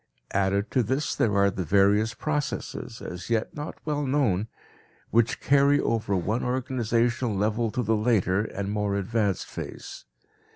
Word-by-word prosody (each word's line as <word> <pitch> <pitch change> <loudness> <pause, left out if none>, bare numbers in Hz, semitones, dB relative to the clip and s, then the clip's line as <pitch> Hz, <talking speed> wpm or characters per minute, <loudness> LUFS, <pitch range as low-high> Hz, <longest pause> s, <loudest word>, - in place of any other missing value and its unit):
Added 100 +1 +1
to 130 - +3
this 130 +6 -1
there 105 -3 +1
are 100 0 +4
the 95 -1 -3
various 100 +6 +3
processes, 145 -5 -3
as 90 +3 -7
yet 115 -1 0
not 150 +1 -5
well 150 -1 -1
known, 130 -8 +1 0.6
which 115 0 +2
carry 140 +1 +4
over 110 -6 0
one 105 +6 -1
organization 120 -2 0
level 110 +3 +1
to 125 +4 -2
the 110 +1 +2
later 105 -4 +2
and 100 -2 -4
more 105 -1 0
advanced 100 -1 0
phase. - - -8
110 Hz, 150 wpm, -26 LUFS, 100-125 Hz, 0.6 s, are